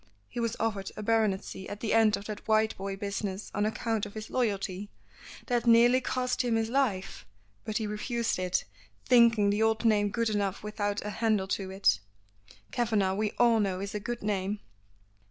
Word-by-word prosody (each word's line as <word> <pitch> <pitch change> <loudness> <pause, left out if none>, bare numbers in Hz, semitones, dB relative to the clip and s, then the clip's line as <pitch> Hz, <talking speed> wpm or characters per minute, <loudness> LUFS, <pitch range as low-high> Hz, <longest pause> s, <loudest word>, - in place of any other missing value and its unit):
He 240 - -5
was 230 -1 -1
offered 205 -4 -2
a 215 - -5
baronetcy 205 -3 0
at 205 - -6
the 215 -1 -1
end 225 -2 +4
of 200 - -10
that 210 -1 -6
Whiteboy 215 -3 +1
business 200 0 -4
on 205 +1 +1
account 220 -1 -1
of 205 - -14
his 215 0 -7
loyalty 205 -4 -1 0.6
that 240 -1 0
nearly 240 +2 +6
cost 255 0 -1
him 240 -3 +1
his 225 0 0
life 240 -9 0 0.4
but 215 -1 -2
he 220 - -2
refused 225 +1 -2
it, 185 -1 0 0.4
thinking 230 -4 +5
the 205 +2 0
old 220 +1 +2
name 205 -2 +3
good 230 +1 0
enough 200 -2 -1
without 205 -1 -2
a 210 - -3
handle 215 -3 +1
to 195 -1 -2
it." 190 - +2 0.7
"Kavanagh, 215 -6 +1
we 210 +1 -1
all 235 -2 +5
know, 195 -3 0
is 200 +1 -5
a 210 - -2
good 240 +2 -5
name." 205 0 -1
215 Hz, 180 wpm, -29 LUFS, 200-230 Hz, 0.7 s, nearly